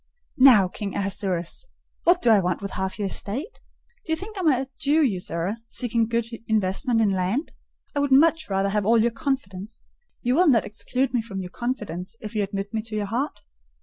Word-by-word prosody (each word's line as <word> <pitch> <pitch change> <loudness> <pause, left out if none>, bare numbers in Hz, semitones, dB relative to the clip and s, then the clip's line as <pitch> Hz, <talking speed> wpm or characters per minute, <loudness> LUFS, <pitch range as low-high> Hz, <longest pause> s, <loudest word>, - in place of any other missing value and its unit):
"Now, 245 -8 +8
King 200 +2 -6
Ahasuerus! 195 - -3 0.4
What 350 +1 +4
do 235 - +5
I 215 - +6
want 180 -2 0
with 200 -1 -5
half 190 0 -3
your 205 - -2
estate? 260 - -4 0.4
Do 320 - -6
you - - +3
think 400 +6 -8
I - - -5
am 360 - +1
a 265 -2 +2
Jew 300 +3 +3
usurer, 185 - -1
seeking 230 -2 +1
good 230 0 0 0.2
investment 220 +3 +1
in 215 - +3
land? 190 - -1 0.4
I - - +1
would 285 -1 0
much 315 +2 +4
rather 195 0 +1
have 210 +1 0
all 225 +3 +4
your 235 +2 +3
confidence. 230 -7 -4 0.4
You 245 0 +2
will 350 +6 +4
not 240 -7 +4
exclude 250 +4 -2
me 245 - +2
from 215 -4 -6
your 180 -1 -7
confidence 210 -7 -4
if 215 - -7
you 215 - 0
admit 200 +1 -4
me 220 - 0
to 220 0 -7
your 210 -1 -1
heart?" 240 +8 -3
225 Hz, 205 wpm, -24 LUFS, 195-265 Hz, 0.4 s, Now